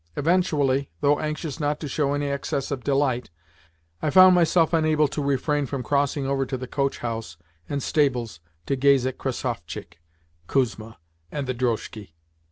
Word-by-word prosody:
Eventually, 145 -5 +1
though 145 0 +3
anxious 155 0 -4
not 150 0 -1
to 155 - -5
show 140 0 0
any 145 0 -1
excess 140 -1 -2
of 130 -3 -3
delight, 135 -3 0 0.7
I 155 - 0
found 185 +3 +8
myself 170 -1 +3
unable 155 -2 +3
to 145 - -4
refrain 140 +1 0
from 135 -1 -4
crossing 140 +1 0
over 135 0 0
to 130 0 -3
the 130 - -6
coach 140 +2 -1
house 115 -8 -5 0.3
and 140 -2 -2
stables 125 - 0 0.3
to 140 - 0
gaze 135 -1 +4
at 130 0 -3
Krassovchik, 120 - -5 0.5
Kuzma, 115 -4 -1 0.3
and 145 - -3
the 130 - -2
drozhki. 110 -6 -3
140 Hz, 160 wpm, -24 LUFS, 130-150 Hz, 0.7 s, found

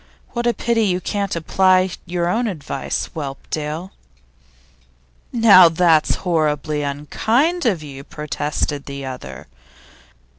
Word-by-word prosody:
What 240 0 -2
a 240 - +3
pity 230 -2 +1
you 180 -2 +1
can't 200 0 -2
apply 185 +2 +3 0.2
your 175 0 -1
own 230 +7 0
advice, 150 -8 -3
Whelpdale!' 155 +4 -5 1.4
'Now 200 -7 +7
that's 165 -2 +3
horribly 155 -3 0
unkind 225 - 0
of 180 -8 0
you!' 140 -2 -9
protested 150 -1 -3
the 140 -1 -6
other. 125 - -8
165 Hz, 110 wpm, -20 LUFS, 150-200 Hz, 1.4 s, Now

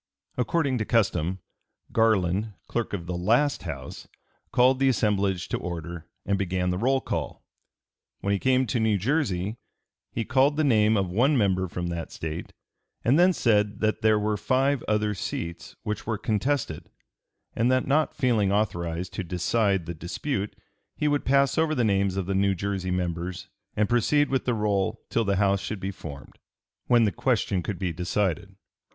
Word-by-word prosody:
According 130 0 0
to 110 - -1
custom 95 -6 +1 0.5
Garland, 105 -2 +2
clerk 120 -2 -2
of 90 -4 -3
the 90 0 -3
last 120 +11 +2
House, 70 -7 -7 0.4
called 130 +1 +4
the 135 0 +4
assemblage 100 -6 +1
to - - -1
order 85 -1 -6 0.2
and 100 -1 0
began 90 -1 0
the 90 - -2
roll 135 +4 +2
call. - - -4 0.8
When 100 - 0
he 100 - 0
came 130 +2 +3
to 120 +1 -1
New 110 -2 +2
Jersey 110 - -1 0.5
he 115 - -2
called 135 +3 +3
the 155 - +2
name 110 -5 +4
of 95 -3 -1
one 130 +9 +3
member 95 -4 +2
from 85 0 -4
that 85 -1 -5
State, 80 +1 -5 0.5
and 135 +7 +4
then 180 +1 +6
said 105 - +1
that 110 0 +1
there 110 -1 +4
were 105 0 0
five 135 +4 +1
other 105 0 +1
seats 85 -3 -5
which 105 0 -4
were 110 -2 0
contested, 110 - -1 0.7
and 120 +3 +2
that 130 0 +2
not 150 +3 +1
feeling 110 -6 +2
authorized 90 -4 -1
to 100 - -3
decide 95 +1 0
the 85 - -4
dispute 95 - -3 0.4
he 150 - 0
would 145 -1 +1
pass 140 +2 +3
over 160 -1 +2
the 125 - +1
names 100 -3 +1
of 95 - -1
the 95 - -2
New 100 0 +2
Jersey 95 0 -3
members 90 0 -3 0.3
and 105 0 +2
proceed 145 +6 +2
with 135 - 0
the 125 - +1
roll 100 -3 0
till 115 - +1
the 100 0 +1
House 100 0 +2
should 105 - -4
be 95 +1 -3
formed, 70 -6 -10 0.5
when 120 -1 +5
the 105 - +2
question 90 +1 0
could 90 +3 -4
be 90 -1 -2
decided. 95 +2 -1
105 Hz, 175 wpm, -26 LUFS, 90-120 Hz, 0.8 s, then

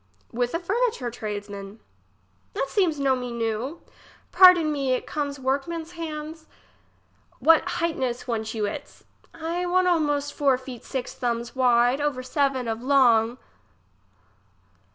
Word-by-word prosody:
fTith 245 +4 -1
a - - 0
furniture 395 - -1
tradesman. 205 -2 -7 0.8
It 270 - -1
seems 345 -8 +1
no 270 -1 +2
me 250 -1 -5
new. 235 +6 -3 0.5
Pardon 360 -4 +7
me, 275 -3 0
it 255 - -2
comes 285 -2 -3
workman's 300 +5 -2
hands. 315 -1 -7 0.9
Which 325 0 +6
hightness 265 -8 -2
want 220 -2 -3
you 215 -2 0
its? 205 - -7 0.3
I 340 +2 -3
want 365 +1 +2
almost 290 -4 +1
four 275 -3 +2
feet 255 -2 -10
six 260 -2 -4
thumbs 235 0 -3
wide's, 245 +1 +3
over 285 -4 -1
seven 270 -2 0
of 225 0 -3
long. 245 -3 +4
270 Hz, 130 wpm, -25 LUFS, 240-315 Hz, 0.9 s, Pardon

